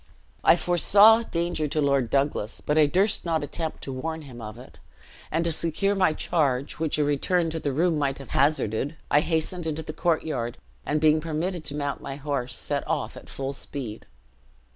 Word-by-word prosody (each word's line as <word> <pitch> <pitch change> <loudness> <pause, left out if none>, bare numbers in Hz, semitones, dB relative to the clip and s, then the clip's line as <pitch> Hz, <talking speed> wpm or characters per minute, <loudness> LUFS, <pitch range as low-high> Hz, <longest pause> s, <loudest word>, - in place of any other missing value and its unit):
I - - +7
foresaw 200 +6 +6
danger 170 -6 -2
to 155 - -2
Lord 140 -4 +2
Douglas, 135 -5 0
but 150 - -1
I 155 -1 +5
durst 195 +7 +2
not 165 -3 0
attempt 160 +2 -5
to 135 - -5
warn 160 +4 -4
him 125 -4 -11
of 110 0 -8
it; 125 - -14 0.5
and, 165 +2 0
to 170 - +1
secure 170 +5 +1
my 190 -4 +3
charge, 145 -4 -1
which 160 -2 0
a 150 - +2
return 160 +4 +1
to 160 - -3
the 145 - -2
room 160 +3 +1
might 140 -2 0
have 135 - -11
hazarded, 140 -1 +1 0.2
I 145 - +6
hastened 160 +2 -1
into 160 0 -3
the - - -6
courtyard, 155 -8 -1 0.3
and 155 - +1
being 155 0 +4
permitted 165 +2 -3
to 145 - -6
mount 145 -1 -3
my 135 - -6
horse, 140 -4 -3
set - - -2
off - - -2
at - - -12
full 135 0 -4
speed. 125 -6 -6
150 Hz, 190 wpm, -26 LUFS, 140-165 Hz, 0.5 s, I